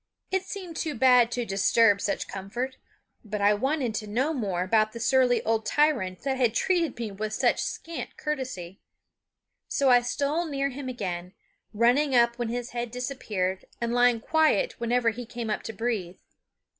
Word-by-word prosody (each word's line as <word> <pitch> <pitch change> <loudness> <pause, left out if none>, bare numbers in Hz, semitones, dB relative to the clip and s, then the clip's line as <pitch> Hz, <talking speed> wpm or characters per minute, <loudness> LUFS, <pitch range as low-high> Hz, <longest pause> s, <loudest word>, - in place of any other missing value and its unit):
It 380 0 +1
seemed 370 -3 -7
too 310 -4 -2
bad 250 -1 +5
to 245 -1 -2
disturb 200 +1 +3
such 200 - -2
comfort; 225 +7 -4 0.5
but 210 -1 -4
I 205 +1 +4
wanted 260 +2 0
to 215 0 -4
know 260 +9 0
more 195 - -1
about 215 +2 +2
the 235 - -7
surly 250 0 +3
old 225 0 +1
tyrant 220 -8 +1
that 270 -1 -1
had 240 -3 +2
treated 335 -3 +1
me 230 -3 -4
with 215 +2 -4
such 250 0 +2
scant 335 0 -5
courtesy; 255 - -4 0.9
so 275 -2 +2
I 245 0 +6
stole 285 +7 -1
near 275 -2 -1
him 270 0 -6
again, 180 -6 -5 0.4
running 250 +6 +3
up 235 0 +3
when 240 -2 -1
his 245 +1 -4
head 240 0 -3
disappeared, 220 -7 -3
and 235 -1 -1
lying 245 -1 +4
quiet 315 - +2
whenever 235 0 +2
he 245 +3 -7
came 235 -1 -5
up - - -1
to - - -6
breathe. 210 -5 -3
240 Hz, 170 wpm, -27 LUFS, 215-265 Hz, 0.9 s, I